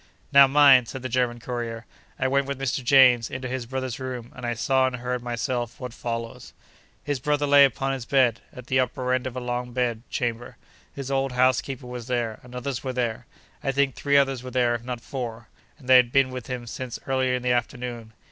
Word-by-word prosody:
Now, 140 Hz, -1 st, +8 dB
mind! 135 Hz, -3 st, +6 dB
(said 130 Hz, +1 st, -7 dB
the 130 Hz, -, -3 dB
German 120 Hz, -1 st, 0 dB
courier) 115 Hz, -1 st, -5 dB, 0.3 s
I 130 Hz, -, 0 dB
went 140 Hz, +1 st, +1 dB
with 140 Hz, -1 st, -4 dB
Mr. 135 Hz, -1 st, -2 dB
James 125 Hz, -3 st, +5 dB
into 130 Hz, 0 st, -5 dB
his 125 Hz, -1 st, -4 dB
brother's 130 Hz, -1 st, -4 dB
room, 125 Hz, -2 st, -6 dB
and 125 Hz, -2 st, -6 dB
I 120 Hz, -, -1 dB
saw 130 Hz, +3 st, +2 dB
and 130 Hz, -, -3 dB
heard 125 Hz, 0 st, -3 dB
myself 120 Hz, 0 st, -3 dB
what 125 Hz, -2 st, -6 dB
follows. 115 Hz, -1 st, -6 dB, 0.5 s
His 145 Hz, -2 st, -2 dB
brother 145 Hz, +1 st, 0 dB
lay 140 Hz, 0 st, +7 dB
upon 135 Hz, +1 st, -1 dB
his 130 Hz, -3 st, -5 dB
bed, 125 Hz, -3 st, +2 dB
at 125 Hz, -, -11 dB
the 130 Hz, +1 st, +1 dB
upper 125 Hz, 0 st, 0 dB
end 130 Hz, 0 st, 0 dB
of 130 Hz, -, -7 dB
a -, -, -2 dB
long 125 Hz, 0 st, -4 dB
bed 120 Hz, -3 st, -1 dB
chamber. 120 Hz, -1 st, -3 dB, 0.3 s
His 140 Hz, -1 st, -6 dB
old 135 Hz, -1 st, 0 dB
housekeeper 130 Hz, +1 st, +1 dB
was 125 Hz, -1 st, -7 dB
there, 120 Hz, -3 st, -2 dB
and 125 Hz, 0 st, -13 dB
others 125 Hz, 0 st, -4 dB
were 130 Hz, -1 st, -3 dB
there: 120 Hz, -3 st, -2 dB, 0.4 s
I 135 Hz, -, +1 dB
think 135 Hz, -1 st, +1 dB
three 140 Hz, 0 st, +2 dB
others 135 Hz, -2 st, +2 dB
were 130 Hz, -, -7 dB
there, 125 Hz, -2 st, +1 dB
if 120 Hz, 0 st, -4 dB
not 125 Hz, -1 st, -5 dB
four, 115 Hz, -5 st, -6 dB, 0.3 s
and 130 Hz, -, -16 dB
they 130 Hz, 0 st, +8 dB
had 120 Hz, -1 st, +4 dB
been 135 Hz, -1 st, +3 dB
with 125 Hz, -3 st, -7 dB
him 125 Hz, -2 st, -5 dB
since 120 Hz, +1 st, -6 dB
early 130 Hz, -1 st, +1 dB
in 125 Hz, -, -4 dB
the 125 Hz, -, +1 dB
afternoon. 120 Hz, -2 st, -3 dB
125 Hz, 220 wpm, -25 LUFS, 120-130 Hz, 0.5 s, Now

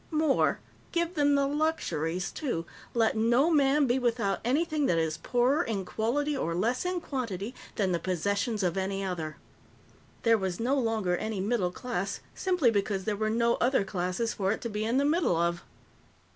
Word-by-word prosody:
More, 310 Hz, -3 st, +2 dB, 0.3 s
give 340 Hz, 0 st, 0 dB
them 290 Hz, -3 st, +3 dB
the 280 Hz, 0 st, +3 dB
luxuries, 185 Hz, -, -1 dB
too 240 Hz, -, -3 dB, 0.3 s
let 225 Hz, -1 st, +3 dB
no 240 Hz, +8 st, +3 dB
man 285 Hz, -1 st, +4 dB
be 250 Hz, +1 st, +2 dB
without 230 Hz, -5 st, 0 dB
anything 295 Hz, +3 st, +1 dB
that 170 Hz, -, +2 dB
is 160 Hz, -1 st, 0 dB
poorer 245 Hz, -, +2 dB
in 200 Hz, -4 st, -3 dB
quality 285 Hz, +9 st, -1 dB
or 165 Hz, -10 st, -1 dB
less 230 Hz, -, 0 dB
in 360 Hz, 0 st, 0 dB
quantity 230 Hz, -, -4 dB, 0.2 s
than 195 Hz, -3 st, +1 dB
the 170 Hz, -, +1 dB
possessions 200 Hz, +5 st, -1 dB
of 180 Hz, 0 st, 0 dB
any 195 Hz, +1 st, -1 dB
other. 165 Hz, -5 st, -4 dB, 0.9 s
There 230 Hz, -1 st, +4 dB
was 190 Hz, -2 st, -2 dB
no 245 Hz, +4 st, +1 dB
longer 220 Hz, -8 st, 0 dB
any 215 Hz, 0 st, -3 dB
middle 200 Hz, -2 st, +1 dB
class 200 Hz, -1 st, -3 dB
simply 360 Hz, -10 st, +2 dB
because 200 Hz, -2 st, 0 dB
there 215 Hz, 0 st, -1 dB
were 215 Hz, +1 st, -1 dB
no 235 Hz, +1 st, +2 dB
other 250 Hz, -3 st, +3 dB
classes 190 Hz, +4 st, -2 dB
for 195 Hz, -2 st, 0 dB
it 220 Hz, -, -2 dB
to 235 Hz, -, -3 dB
be 210 Hz, 0 st, -2 dB
in 235 Hz, +3 st, +1 dB
the 280 Hz, -, +3 dB
middle 310 Hz, -, +2 dB
of. 170 Hz, +1 st, 0 dB
225 Hz, 180 wpm, -29 LUFS, 190-270 Hz, 0.9 s, man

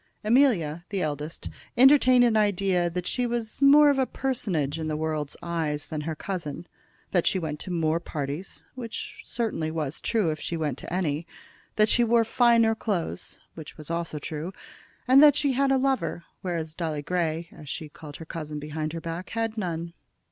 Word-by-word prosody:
Amelia, 210 Hz, -, +3 dB
the 195 Hz, -2 st, -1 dB
eldest, 150 Hz, +1 st, -4 dB, 0.3 s
entertained 255 Hz, -1 st, +7 dB
an 235 Hz, -2 st, +3 dB
idea 195 Hz, -4 st, +2 dB
that 180 Hz, +1 st, -4 dB
she 250 Hz, +4 st, 0 dB
was 235 Hz, 0 st, -3 dB
more 290 Hz, +1 st, +8 dB
of 275 Hz, -, 0 dB
a 260 Hz, -, +2 dB
personage 180 Hz, -, -1 dB
in 160 Hz, -, -3 dB
the 155 Hz, -1 st, -1 dB
world's 155 Hz, -2 st, -2 dB
eyes 160 Hz, -4 st, -2 dB
than 155 Hz, -2 st, -3 dB
her 160 Hz, +1 st, -3 dB
cousin, 170 Hz, -2 st, -5 dB, 0.5 s
that 175 Hz, -3 st, +2 dB
she -, -, +2 dB
went 155 Hz, -4 st, -3 dB
to -, -, -7 dB
more 165 Hz, -1 st, +1 dB
parties, 150 Hz, +2 st, -5 dB
which 235 Hz, -4 st, -7 dB
certainly 220 Hz, -9 st, -2 dB
was 155 Hz, -2 st, -3 dB
true 215 Hz, -8 st, +1 dB
if 155 Hz, -, -5 dB
she 170 Hz, -, -3 dB
went 150 Hz, -5 st, -2 dB
to -, -, -9 dB
any, 170 Hz, -3 st, -1 dB, 0.5 s
that 215 Hz, 0 st, +4 dB
she 240 Hz, -, +3 dB
wore 235 Hz, 0 st, +4 dB
finer 230 Hz, -1 st, +4 dB
clothes, 185 Hz, -, -3 dB
which 160 Hz, -2 st, -10 dB
was 155 Hz, +1 st, -8 dB
also 170 Hz, -2 st, -2 dB
true, 155 Hz, +4 st, -5 dB, 0.6 s
and 260 Hz, +2 st, +8 dB
that 295 Hz, -2 st, +8 dB
she 290 Hz, -1 st, +2 dB
had 275 Hz, +1 st, +2 dB
a 270 Hz, -, +4 dB
lover, 265 Hz, -9 st, 0 dB, 0.2 s
whereas 165 Hz, -4 st, -3 dB
Dolly 160 Hz, -3 st, -3 dB
Grey, 170 Hz, 0 st, -1 dB
as 150 Hz, -, -11 dB
she 155 Hz, -, -4 dB
called 150 Hz, 0 st, -11 dB
her 165 Hz, -, -9 dB
cousin 155 Hz, -2 st, -6 dB
behind 155 Hz, +1 st, -4 dB
her 165 Hz, -, -4 dB
back, 170 Hz, +3 st, -5 dB
had 225 Hz, -1 st, -2 dB
none. 170 Hz, -5 st, -3 dB
170 Hz, 185 wpm, -26 LUFS, 155-230 Hz, 0.6 s, more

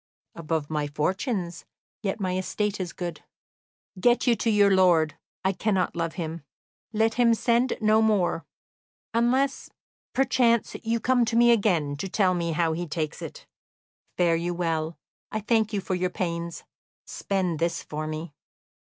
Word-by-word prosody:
"Above 160 Hz, -2 st, -2 dB
my 150 Hz, -1 st, -1 dB
fortunes, 180 Hz, -, -2 dB, 0.4 s
yet 200 Hz, 0 st, -2 dB
my 185 Hz, -2 st, -1 dB
estate 205 Hz, +2 st, -2 dB
is 180 Hz, -2 st, -3 dB
good." 175 Hz, -4 st, -6 dB, 0.8 s
"Get 240 Hz, +6 st, +3 dB
you 240 Hz, -, +4 dB
to 230 Hz, -, -1 dB
your 205 Hz, -2 st, +5 dB
lord; 175 Hz, -5 st, +4 dB, 0.3 s
I 190 Hz, -, +4 dB
cannot 195 Hz, -1 st, 0 dB
love 165 Hz, -1 st, -2 dB
him. 165 Hz, -2 st, -5 dB, 0.5 s
Let 220 Hz, 0 st, +2 dB
him 235 Hz, -1 st, +4 dB
send 240 Hz, +2 st, +1 dB
no 215 Hz, 0 st, +4 dB
more 205 Hz, -6 st, +2 dB, 0.7 s
unless, 250 Hz, +4 st, +1 dB, 0.4 s
perchance, 245 Hz, -3 st, +2 dB
you 230 Hz, 0 st, 0 dB
come 250 Hz, +2 st, +3 dB
to 230 Hz, 0 st, -2 dB
me 240 Hz, 0 st, +6 dB
again 175 Hz, -11 st, +2 dB
to 190 Hz, +6 st, -4 dB
tell 185 Hz, -1 st, +2 dB
me 170 Hz, -2 st, -1 dB
how 165 Hz, 0 st, +1 dB
he 175 Hz, +2 st, -3 dB
takes 155 Hz, 0 st, -3 dB
it. -, -, -8 dB, 0.7 s
Fare 170 Hz, -2 st, +3 dB
you 175 Hz, +1 st, -2 dB
well; 165 Hz, -2 st, -1 dB, 0.3 s
I 215 Hz, -, -1 dB
thank 220 Hz, 0 st, +1 dB
you 205 Hz, -, -1 dB
for 190 Hz, -, -3 dB
your 180 Hz, 0 st, 0 dB
pains. 170 Hz, -2 st, -4 dB, 0.4 s
Spend 185 Hz, -5 st, -2 dB
this 170 Hz, +1 st, -1 dB
for 155 Hz, +1 st, -5 dB
me." 155 Hz, 0 st, -5 dB
185 Hz, 155 wpm, -26 LUFS, 165-225 Hz, 0.8 s, me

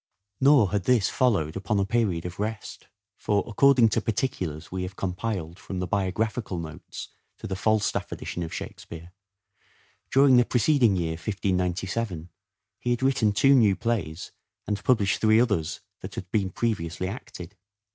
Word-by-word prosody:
Nor 135 Hz, -8 st, +5 dB
had 100 Hz, -2 st, -1 dB
this 120 Hz, -6 st, +3 dB
followed 100 Hz, -12 st, +1 dB
upon 100 Hz, +2 st, -1 dB
a 100 Hz, -, +2 dB
period 100 Hz, -7 st, 0 dB
of 90 Hz, +1 st, -7 dB
rest; 110 Hz, +1 st, -5 dB, 0.3 s
for, 100 Hz, -1 st, 0 dB
according 125 Hz, +1 st, +4 dB
to 115 Hz, -, 0 dB
particulars 90 Hz, -, -3 dB
we 95 Hz, 0 st, -3 dB
have 90 Hz, +1 st, -5 dB
compiled 90 Hz, -3 st, -4 dB
from 95 Hz, -, -6 dB
the 90 Hz, -, -1 dB
Biographical 100 Hz, +2 st, -1 dB
Notes 80 Hz, -2 st, -8 dB, 0.3 s
to -, -, -9 dB
the 95 Hz, -, -3 dB
Falstaff 110 Hz, +1 st, 0 dB
Edition 90 Hz, -, -5 dB
of 80 Hz, -1 st, -4 dB
Shake -, -, -6 dB
speare, 85 Hz, +1 st, -10 dB, 1.0 s
during 135 Hz, -1 st, +5 dB
the 120 Hz, -, +6 dB
preceding 120 Hz, -3 st, +3 dB
year 85 Hz, -3 st, -1 dB
(1597) 90 Hz, -1 st, -2 dB, 0.5 s
he 120 Hz, -, -3 dB
had 120 Hz, +1 st, 0 dB
written 130 Hz, -5 st, +3 dB
two 135 Hz, +7 st, +4 dB
new 110 Hz, -7 st, +5 dB
plays 100 Hz, -9 st, -3 dB, 0.3 s
and 105 Hz, -1 st, -3 dB
published 105 Hz, -7 st, +2 dB
three 110 Hz, 0 st, +5 dB
others 95 Hz, -9 st, 0 dB, 0.2 s
that -, -, -8 dB
had 90 Hz, -, -7 dB
been 100 Hz, -4 st, +1 dB
previously 95 Hz, -5 st, -2 dB
acted. 100 Hz, -3 st, -8 dB
100 Hz, 155 wpm, -26 LUFS, 90-115 Hz, 1.0 s, the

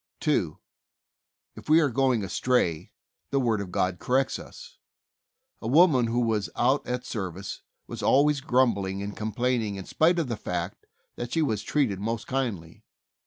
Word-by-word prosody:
2. -, -, 0 dB, 1.0 s
If -, -, -12 dB
we 155 Hz, +2 st, +7 dB
are 145 Hz, -5 st, +2 dB
going 130 Hz, -3 st, +2 dB
astray, 95 Hz, -5 st, 0 dB, 0.4 s
the 140 Hz, -, +1 dB
Word 115 Hz, -5 st, +1 dB
of 95 Hz, -3 st, -7 dB
God 90 Hz, -1 st, 0 dB
corrects 130 Hz, +2 st, +1 dB
us. -, -, -12 dB, 0.8 s
A 110 Hz, -, -4 dB
woman, 140 Hz, -3 st, +5 dB
who 120 Hz, +2 st, 0 dB
was 110 Hz, -3 st, 0 dB
out 130 Hz, +4 st, +1 dB
at 125 Hz, 0 st, -3 dB
service, 95 Hz, -3 st, -5 dB, 0.2 s
was -, -, -7 dB
always 145 Hz, +1 st, +3 dB
grumbling 105 Hz, -8 st, +1 dB
and 100 Hz, 0 st, -5 dB
com 110 Hz, 0 st, -3 dB
plaining 120 Hz, -3 st, 0 dB
in 95 Hz, -1 st, -7 dB
spite 170 Hz, +3 st, +2 dB
of 165 Hz, -5 st, 0 dB
the 120 Hz, -, -2 dB
fact 90 Hz, 0 st, -5 dB, 0.3 s
that 120 Hz, 0 st, -5 dB
she 165 Hz, -, +2 dB
was 110 Hz, -8 st, -1 dB
treated 115 Hz, -6 st, 0 dB
most 115 Hz, +2 st, -3 dB
kindly. 110 Hz, -12 st, -3 dB
120 Hz, 165 wpm, -27 LUFS, 100-135 Hz, 1.0 s, we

